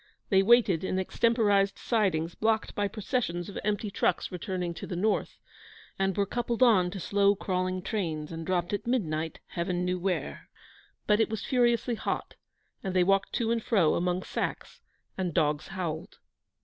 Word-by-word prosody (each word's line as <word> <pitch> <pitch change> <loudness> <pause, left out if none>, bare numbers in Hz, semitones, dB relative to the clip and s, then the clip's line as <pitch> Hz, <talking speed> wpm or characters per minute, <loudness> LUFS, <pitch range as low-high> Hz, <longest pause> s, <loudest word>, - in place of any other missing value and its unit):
They 195 -2 +5
waited 200 -5 +4
in 185 - -1
extemporised 205 0 +2
sidings 175 -8 0
blocked 220 0 0
by 205 0 0
processions 200 -4 -2
of 200 - -6
empty 210 0 -1
trucks - - 0
returning 180 -1 -3
to - - -7
the 180 - -4
north, 210 +5 0 0.6
and 195 -1 0
were 200 - +2
coupled 240 +2 0
on 195 -8 +5
to 195 +2 -6
slow, 200 +2 +3
crawling 185 -1 -2
trains, 165 -8 -3
and 165 0 -5
dropped 175 +1 -1
at 205 - -3
midnight, 160 -10 -1
Heaven 175 +1 -2
knew 180 0 -1
where; 185 0 -3 0.6
but 210 0 +3
it 225 - +3
was 220 -1 -4
furiously 240 -2 +2
hot; 225 - -3 0.5
and 190 -2 -3
they 180 - +5
walked 195 +1 +2
to 230 -1 0
and 230 -1 +1
fro 195 -9 +3
among 180 +1 0
sacks, - - -4 0.4
and 180 -4 -2
dogs 150 0 +1
howled. 175 -5 -5
190 Hz, 165 wpm, -29 LUFS, 175-215 Hz, 0.6 s, They